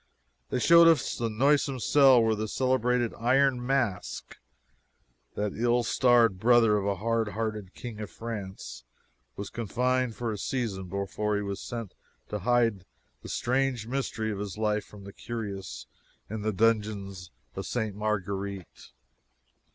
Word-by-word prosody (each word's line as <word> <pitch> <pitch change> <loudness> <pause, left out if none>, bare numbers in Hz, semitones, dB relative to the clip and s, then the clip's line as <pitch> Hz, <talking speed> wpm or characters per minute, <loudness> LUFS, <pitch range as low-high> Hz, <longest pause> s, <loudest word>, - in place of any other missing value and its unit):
They - - -1
showed 170 +6 +7
us 165 -2 +3
the 115 -1 -2
noisome 135 +3 +2
cell 130 -1 +5
where 110 0 +2
the 110 0 -3
celebrated 125 -1 +1
"Iron 130 +1 +3
Mask" 125 -7 -2 1.0
that 105 -1 -2
ill 120 +1 +2
starred 120 -5 +3
brother 115 -1 +5
of 100 -1 -1
a 100 - +1
hardhearted 110 -1 -2
king 115 -4 -8
of 105 -2 -5
France 95 - -7 0.5
was 100 - -6
confined 125 +2 -1
for 120 -2 -3
a 105 - -5
season 100 -6 -3
before 100 +2 -2
he 105 - -1
was 100 -1 -4
sent 115 -5 -6 0.4
to 105 - -3
hide 115 -2 +2 0.4
the - - -9
strange 130 -2 0
mystery 115 -3 -2
of 100 - -4
his 100 -1 -5
life 105 -1 0
from 105 -1 -13
the 100 0 -10
curious 100 -5 -6 0.5
in 110 -1 -4
the 110 +1 0
dungeons 105 -4 0 0.3
of 95 -2 -5
Ste. 110 -1 -2
Marguerite. 100 - -4
110 Hz, 145 wpm, -28 LUFS, 100-120 Hz, 1.0 s, showed